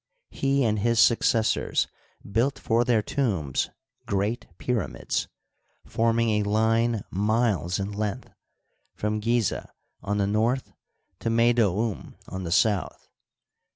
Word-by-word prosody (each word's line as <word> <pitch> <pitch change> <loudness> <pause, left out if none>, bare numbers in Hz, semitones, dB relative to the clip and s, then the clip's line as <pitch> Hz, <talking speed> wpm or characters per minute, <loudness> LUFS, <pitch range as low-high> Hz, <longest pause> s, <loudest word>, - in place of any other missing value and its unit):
He 135 0 +1
and 110 -2 +1
his 115 +2 +2
successors 115 -1 +3 0.4
built 115 +7 +1
for 115 +1 +1
their 115 -3 +2
tombs 95 - -1 0.4
great 100 +4 -1
pyramids, 125 -3 -2 0.6
form 115 0 +1
ing 115 0 +2
a 100 - -2
line 110 +1 +2
miles 100 - +1
in 100 +1 -3
length, 105 -1 -4 0.6
from 105 0 -1
Gizeh 115 0 0 0.3
on 105 +1 -2
the 100 - +2
north 115 +6 0 0.5
to 115 - -2
Meydoum 115 -3 +1
on 95 0 -5
the 85 - -4
south. 105 0 +1
110 Hz, 120 wpm, -26 LUFS, 100-115 Hz, 0.6 s, successors